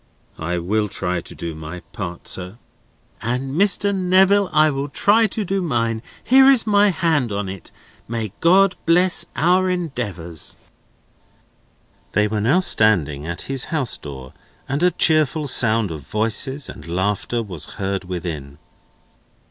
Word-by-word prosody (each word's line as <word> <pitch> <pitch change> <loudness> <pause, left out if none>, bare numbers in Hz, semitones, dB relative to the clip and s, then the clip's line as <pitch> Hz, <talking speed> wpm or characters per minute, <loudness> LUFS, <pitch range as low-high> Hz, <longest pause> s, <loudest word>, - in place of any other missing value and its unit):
"I 85 +2 -2
will 105 +5 -1
try 90 -1 -2
to - - -10
do 85 -1 -5
my 80 +3 -8
part, 90 -5 -7
sir." 95 +3 -3 0.6
"And, 125 +4 -3
Mr. 200 +2 +2
Neville, 190 +1 +3
I 155 0 +4
will 140 +1 -3
try 220 +9 +3
to 210 +1 -3
do 195 +1 -1
mine. 115 -8 -1 0.2
Here 265 +1 +6
is 265 -4 +4
my 205 -1 +4
hand 165 - 0
on 100 -1 -3
it. 95 -1 -8 0.4
May 115 -3 -4
God 190 +3 +4
bless 180 +2 +3
our 185 +3 +2
endeavours!" 105 - -4 1.6
They 105 0 +2
were 105 0 -2
now 140 - +3
standing 80 - +2
at 85 +1 -5
his 135 -2 -2
house 150 -8 0
door, 65 -3 -9 0.3
and 140 +3 -2
a 180 - +5
cheerful 155 -3 +2
sound 115 -6 +3
of 80 -2 -6
voices 120 +6 +1
and - - -11
laughter 100 +6 -1
was 90 -8 -6
heard 95 -1 -3
within. 80 -6 -6
120 Hz, 145 wpm, -20 LUFS, -, 1.6 s, Here